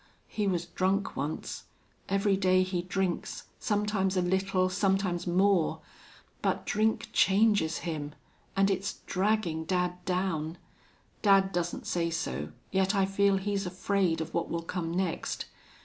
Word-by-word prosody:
He 210 Hz, -2 st, -1 dB
was 175 Hz, -3 st, 0 dB
drunk 190 Hz, +3 st, 0 dB
once. 145 Hz, +3 st, -4 dB, 0.4 s
Every 195 Hz, +1 st, +2 dB
day 185 Hz, -1 st, +3 dB
he 185 Hz, -1 st, -1 dB
drinks, 185 Hz, 0 st, -2 dB, 0.2 s
sometimes 205 Hz, -2 st, 0 dB
a 180 Hz, -, +3 dB
little, 190 Hz, +1 st, +1 dB
sometimes 190 Hz, -2 st, 0 dB
more. 185 Hz, -1 st, +3 dB, 0.6 s
But -, -, 0 dB
drink 220 Hz, +1 st, +1 dB
changes 195 Hz, -5 st, +4 dB
him. 150 Hz, -3 st, -4 dB, 0.4 s
And 195 Hz, 0 st, +3 dB
it's 195 Hz, +1 st, -1 dB
dragging 185 Hz, -4 st, 0 dB
dad 180 Hz, +1 st, -1 dB
down. 180 Hz, -3 st, -1 dB, 0.6 s
Dad 195 Hz, -2 st, +5 dB
doesn't 175 Hz, -1 st, -2 dB
say 170 Hz, -1 st, 0 dB
so, 75 Hz, -, -3 dB, 0.2 s
yet 190 Hz, +1 st, +2 dB
I 195 Hz, -1 st, +3 dB
feel 195 Hz, 0 st, +3 dB
he's 195 Hz, 0 st, -1 dB
afraid 185 Hz, -2 st, 0 dB
of 160 Hz, +1 st, -5 dB
what 170 Hz, -, -1 dB
will 170 Hz, 0 st, -2 dB
come 165 Hz, -1 st, -3 dB
next.... 180 Hz, -1 st, -2 dB
185 Hz, 135 wpm, -29 LUFS, 175-195 Hz, 0.6 s, Dad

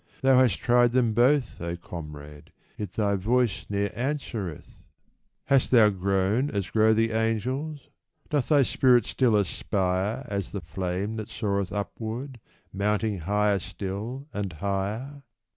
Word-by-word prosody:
Thou 135 Hz, -1 st, +6 dB
hast 125 Hz, -7 st, +3 dB
tried 120 Hz, -1 st, +3 dB
them 120 Hz, -3 st, +2 dB
both, 125 Hz, -, +2 dB
O 85 Hz, 0 st, -3 dB
comrade, 75 Hz, -4 st, -9 dB, 0.2 s
yet 100 Hz, -4 st, -6 dB
thy 100 Hz, -1 st, +1 dB
voice 115 Hz, +4 st, 0 dB
ne'er 100 Hz, -1 st, -1 dB
answereth! 120 Hz, -, -4 dB, 0.6 s
Hast 135 Hz, -2 st, +3 dB
thou 110 Hz, -4 st, +6 dB
grown 100 Hz, +7 st, +1 dB
as 100 Hz, -6 st, -3 dB
grow 110 Hz, 0 st, +4 dB
the 115 Hz, +1 st, +2 dB
angels? 125 Hz, +7 st, -2 dB, 0.4 s
Doth 145 Hz, -4 st, 0 dB
thy 145 Hz, -3 st, +5 dB
spirit 125 Hz, -3 st, +4 dB
still 125 Hz, -4 st, +2 dB
aspire 100 Hz, +4 st, 0 dB
As 100 Hz, -1 st, -4 dB
the 100 Hz, -, -3 dB
flame 90 Hz, +6 st, -3 dB
that 110 Hz, -1 st, -5 dB
soareth 100 Hz, -3 st, -2 dB
upward, 115 Hz, +5 st, -5 dB, 0.3 s
mounting 105 Hz, +1 st, 0 dB
higher 105 Hz, +3 st, +1 dB
still, 105 Hz, +9 st, -5 dB
and 100 Hz, -3 st, -3 dB
higher 100 Hz, -, -3 dB
105 Hz, 135 wpm, -26 LUFS, 95-125 Hz, 0.6 s, Thou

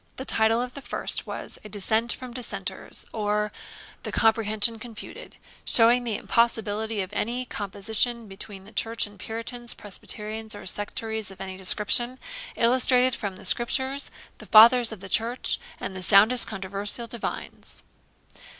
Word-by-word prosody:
The 265 Hz, -, -7 dB
title 225 Hz, -2 st, +2 dB
of 250 Hz, 0 st, -7 dB
the 280 Hz, -, -9 dB
first -, -, -1 dB
was -, -, -6 dB
'A 215 Hz, -, -10 dB
Dissent 220 Hz, +4 st, 0 dB
from 255 Hz, -2 st, -6 dB
Dissenters, 250 Hz, -1 st, -5 dB
or 210 Hz, -1 st, -1 dB, 0.5 s
the -, -, -5 dB
Comprehension 225 Hz, 0 st, +1 dB
confuted; 225 Hz, -1 st, -11 dB, 0.3 s
showing 240 Hz, +1 st, +7 dB
the 230 Hz, -3 st, 0 dB
Impossibility 220 Hz, -2 st, 0 dB
of 190 Hz, +2 st, -7 dB
any 240 Hz, +4 st, -2 dB
Composition 220 Hz, +3 st, -2 dB
between 195 Hz, 0 st, -9 dB
the 205 Hz, -, -15 dB
Church 225 Hz, +1 st, +1 dB
and 205 Hz, -1 st, -15 dB
Puritans, 230 Hz, +3 st, -4 dB
Presbyterians, 215 Hz, +2 st, -4 dB
or 205 Hz, -, -10 dB
Sectaries 220 Hz, +2 st, -3 dB
of 195 Hz, -, -12 dB
any 190 Hz, -1 st, -6 dB
Description; 210 Hz, +6 st, +2 dB, 0.4 s
illustrated 250 Hz, +1 st, +3 dB
from 200 Hz, -3 st, -5 dB
the -, -, -11 dB
Scriptures, 265 Hz, +3 st, +1 dB, 0.3 s
the -, -, -12 dB
Fathers 230 Hz, +2 st, +7 dB
of 215 Hz, -4 st, -9 dB
the 195 Hz, -, -8 dB
Church, 235 Hz, +4 st, +1 dB, 0.2 s
and 190 Hz, -, -6 dB
the 185 Hz, -, -6 dB
soundest 215 Hz, +6 st, +6 dB
Controversial 200 Hz, +2 st, -2 dB
Divines.' 235 Hz, 0 st, -6 dB
220 Hz, 145 wpm, -25 LUFS, 205-240 Hz, 0.5 s, showing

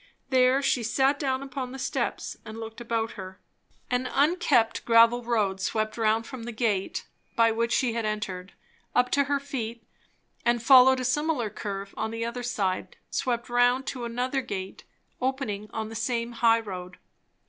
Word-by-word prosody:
There 260 Hz, +1 st, +4 dB
she 275 Hz, -2 st, +2 dB
sat 265 Hz, +5 st, +2 dB
down 265 Hz, -2 st, -1 dB
upon 260 Hz, -2 st, -5 dB
the -, -, -6 dB
steps 265 Hz, -, -2 dB
and 220 Hz, 0 st, -9 dB
looked 225 Hz, +1 st, -8 dB
about 230 Hz, -1 st, -1 dB
her. 190 Hz, -1 st, -9 dB, 0.5 s
An 250 Hz, +1 st, +1 dB
unkept 285 Hz, -6 st, +2 dB
gravel 230 Hz, +1 st, +5 dB
road 210 Hz, -5 st, 0 dB
swept 215 Hz, +2 st, -1 dB
round 225 Hz, 0 st, +1 dB
from 260 Hz, -1 st, -8 dB
the 235 Hz, +1 st, -5 dB
gate 215 Hz, -4 st, -1 dB, 0.3 s
by 230 Hz, -1 st, +4 dB
which 230 Hz, +1 st, 0 dB
she 245 Hz, -2 st, +2 dB
had 230 Hz, 0 st, -2 dB
entered, 200 Hz, -3 st, -4 dB, 0.4 s
up 250 Hz, 0 st, +3 dB
to 280 Hz, 0 st, +3 dB
her 285 Hz, 0 st, 0 dB
feet, 240 Hz, -5 st, -5 dB, 0.6 s
and 240 Hz, -1 st, +1 dB
following 260 Hz, +1 st, +7 dB
a -, -, -2 dB
similar 255 Hz, -4 st, 0 dB
curve 200 Hz, -1 st, -5 dB
on 220 Hz, -, -2 dB
the 230 Hz, +1 st, -3 dB
other 235 Hz, +1 st, -4 dB
side 195 Hz, -6 st, -2 dB
swept 235 Hz, -2 st, -1 dB
round 245 Hz, +2 st, +3 dB
to 255 Hz, -2 st, -4 dB
another 250 Hz, +3 st, -1 dB
gate, 195 Hz, -6 st, -6 dB, 0.4 s
opening 250 Hz, -6 st, -2 dB
on 220 Hz, -1 st, -4 dB
the 225 Hz, -, -8 dB
same 230 Hz, +1 st, -1 dB
high 230 Hz, -1 st, +4 dB
road. 180 Hz, -4 st, -7 dB
235 Hz, 170 wpm, -27 LUFS, 220-255 Hz, 0.6 s, following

